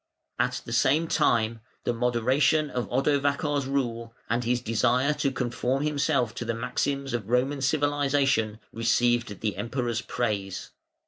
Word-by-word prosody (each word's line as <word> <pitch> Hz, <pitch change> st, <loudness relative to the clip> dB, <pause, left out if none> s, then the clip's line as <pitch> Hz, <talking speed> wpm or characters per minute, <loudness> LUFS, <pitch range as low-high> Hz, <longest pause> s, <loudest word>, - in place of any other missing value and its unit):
At -, -, 0 dB
the -, -, -5 dB
same 155 Hz, +5 st, +3 dB
time, 115 Hz, -6 st, +1 dB, 0.2 s
the -, -, 0 dB
moderation 130 Hz, +6 st, +2 dB
of 125 Hz, -1 st, -3 dB
Odovacar's 140 Hz, +1 st, +1 dB
rule, 120 Hz, -4 st, -2 dB, 0.2 s
and 120 Hz, +1 st, +1 dB
his 120 Hz, +1 st, +1 dB
desire 125 Hz, +4 st, +2 dB
to 140 Hz, -, 0 dB
conform 130 Hz, +2 st, -1 dB
himself 140 Hz, -5 st, +1 dB
to -, -, -3 dB
the 115 Hz, -1 st, -2 dB
maxims 135 Hz, +3 st, -2 dB
of 115 Hz, -3 st, -3 dB
Roman 135 Hz, +3 st, +1 dB
civilisation, 140 Hz, -5 st, +1 dB, 0.2 s
received 115 Hz, -1 st, +1 dB
the 105 Hz, -4 st, -1 dB
Emperor's 120 Hz, +2 st, -2 dB
praise. 100 Hz, -7 st, -3 dB
125 Hz, 135 wpm, -27 LUFS, 115-140 Hz, 0.2 s, same